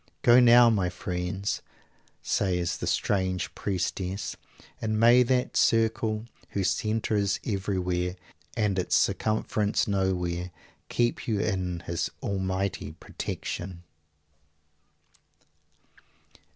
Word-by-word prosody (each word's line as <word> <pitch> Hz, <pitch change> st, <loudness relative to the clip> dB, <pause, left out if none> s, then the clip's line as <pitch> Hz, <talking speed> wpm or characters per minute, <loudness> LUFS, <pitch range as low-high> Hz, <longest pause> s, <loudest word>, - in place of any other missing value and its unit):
"Go 120 Hz, +1 st, +7 dB
now, 120 Hz, 0 st, +8 dB
my 95 Hz, -5 st, +1 dB
friends," 90 Hz, +2 st, -3 dB, 0.6 s
says 90 Hz, -3 st, 0 dB
the -, -, -3 dB
strange 95 Hz, -5 st, 0 dB
Priestess, 95 Hz, 0 st, -3 dB, 0.5 s
"and 110 Hz, -1 st, 0 dB
may 120 Hz, +2 st, +7 dB
that 125 Hz, 0 st, +1 dB
Circle 110 Hz, -1 st, +2 dB, 0.2 s
whose 95 Hz, -2 st, 0 dB
Centre 110 Hz, 0 st, -1 dB
is 100 Hz, -1 st, +1 dB
everywhere 90 Hz, -3 st, -1 dB, 0.4 s
and 105 Hz, -4 st, +1 dB
its 90 Hz, -, +1 dB
Circumference 110 Hz, -1 st, +1 dB
nowhere, 90 Hz, -3 st, -1 dB, 0.4 s
keep 120 Hz, 0 st, 0 dB
you 110 Hz, -3 st, +1 dB
in 90 Hz, -3 st, -1 dB
His 85 Hz, 0 st, -2 dB
Almighty 95 Hz, -1 st, -2 dB
protection!" 90 Hz, -1 st, -6 dB
100 Hz, 95 wpm, -27 LUFS, 90-110 Hz, 0.6 s, now